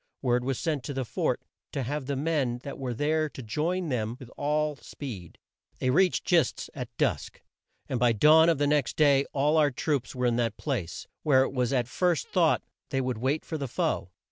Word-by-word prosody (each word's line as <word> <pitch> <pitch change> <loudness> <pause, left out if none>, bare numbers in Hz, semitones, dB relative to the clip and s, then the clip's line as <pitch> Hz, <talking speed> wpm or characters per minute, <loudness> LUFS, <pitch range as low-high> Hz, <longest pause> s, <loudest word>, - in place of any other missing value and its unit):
Word 125 -1 +2
was 130 -1 -1
sent 150 -6 -1
to 140 - -4
the 130 -1 -2
fort - - -1 0.3
to 135 - -1
have 140 +2 -3
the 140 - -1
men 140 -4 0
that 140 - -7
were 125 -3 -3
there 155 +4 +1
join 155 +9 -2
them 115 -3 -1
with 125 -2 -11
all 150 +1 0
speed. 110 - -8 0.4
They 130 - +1
reached 185 +5 +3
Gist's 170 -3 +1
at 125 -5 -5
dusk, 115 - -1 0.4
and 130 - -2
by 120 0 +4
dawn 155 +8 +6
of 165 - +3
the 145 - +1
next 145 -3 +1
day 140 -2 +4
all 145 +3 +2
our 150 -2 +5
troops 140 0 -2
were 125 0 -1
in 120 -1 +2
that 115 -3 0
place, 120 - -3 0.2
where 130 -3 +4
it - - -3
was 125 -2 0
at 125 -3 +1
first 175 +5 0
thought 170 -4 +3 0.3
they 135 - 0
would 125 -3 -2
wait 135 +6 0
for 160 - -4
the 140 - -3
foe. 150 - -1
140 Hz, 205 wpm, -28 LUFS, 125-150 Hz, 0.4 s, dawn